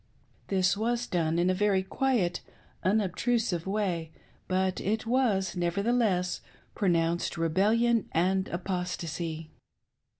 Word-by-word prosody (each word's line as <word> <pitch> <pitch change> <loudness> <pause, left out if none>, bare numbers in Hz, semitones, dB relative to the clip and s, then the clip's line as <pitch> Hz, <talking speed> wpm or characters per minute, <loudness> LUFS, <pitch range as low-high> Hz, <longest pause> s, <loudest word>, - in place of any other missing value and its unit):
This 190 -1 +2
was 235 +3 0
done 165 -5 0
in 175 +2 +3
a - - +2
very 195 0 +2
quiet, 215 -4 0 0.4
unobtrusive 200 -1 +1
way, 185 -6 -1 0.4
but 185 0 0
it 220 +4 -1
was, 225 -7 +1
nevertheless, 185 +1 +1 0.3
pronounced 170 -3 +1
rebellion 215 +7 +2
and 190 +3 +1
apostacy. 170 -3 -4
190 Hz, 100 wpm, -29 LUFS, 175-215 Hz, 0.4 s, in